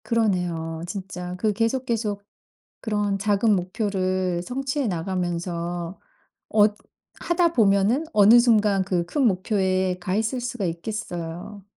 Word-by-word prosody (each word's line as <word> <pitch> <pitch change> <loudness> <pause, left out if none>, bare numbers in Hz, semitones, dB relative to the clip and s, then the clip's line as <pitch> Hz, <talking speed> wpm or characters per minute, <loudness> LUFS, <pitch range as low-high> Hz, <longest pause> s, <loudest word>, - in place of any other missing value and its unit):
그러네요. 180 -8 -1
진짜 180 -2 -6
그 215 +2 +1
계속 230 +5 0
계속 215 -4 -2 0.6
그런 205 -3 -1
작은 205 +1 +2
목표를 185 -1 -1
성취해 265 +4 -2
나가면서 175 -1 -3 0.5
어 210 -1 +6 0.5
하다 345 -1 +1
보면은 215 +5 +3
어느 215 +3 +7
순간 210 -5 +3
그 180 -2 -1
큰 285 - -1
목표에 185 -2 0
가 185 +1 -2
있을 225 +4 -1
수가 240 -4 -3
있겠어요. 175 +1 -5
200 Hz, 250 characters per minute, -24 LUFS, 180-225 Hz, 0.6 s, 어느